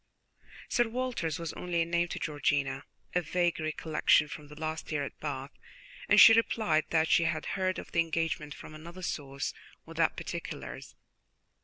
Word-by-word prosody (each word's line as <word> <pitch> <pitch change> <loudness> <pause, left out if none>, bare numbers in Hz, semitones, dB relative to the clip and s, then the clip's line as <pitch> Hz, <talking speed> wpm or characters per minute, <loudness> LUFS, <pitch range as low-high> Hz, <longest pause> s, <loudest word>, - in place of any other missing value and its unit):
Sir 240 -2 +2
Walter's 240 - -2
was 165 -2 -5
only 170 -2 -1
a - - -4
name 170 +1 +1
to - - -5
Georgiana, 140 -2 -1 0.3
a 180 - +2
vague 175 +2 0
recollection 155 -1 +2
from 150 0 -9
the 150 +1 -12
last 160 0 -4
year 145 -2 0
at - - -7
Bath, 140 -2 -4 0.6
and - - +7
she 225 - +11
replied 220 -8 +2
that 160 -1 +3
she 170 - +4
had 160 -1 -1
heard 185 -1 0
of - - -8
the 170 - +1
engagement 165 -2 -1
from - - -11
another 170 +4 -10
source, 140 -4 -3 0.3
without - - 0
particulars. - - -6
160 Hz, 165 wpm, -30 LUFS, 150-175 Hz, 0.6 s, she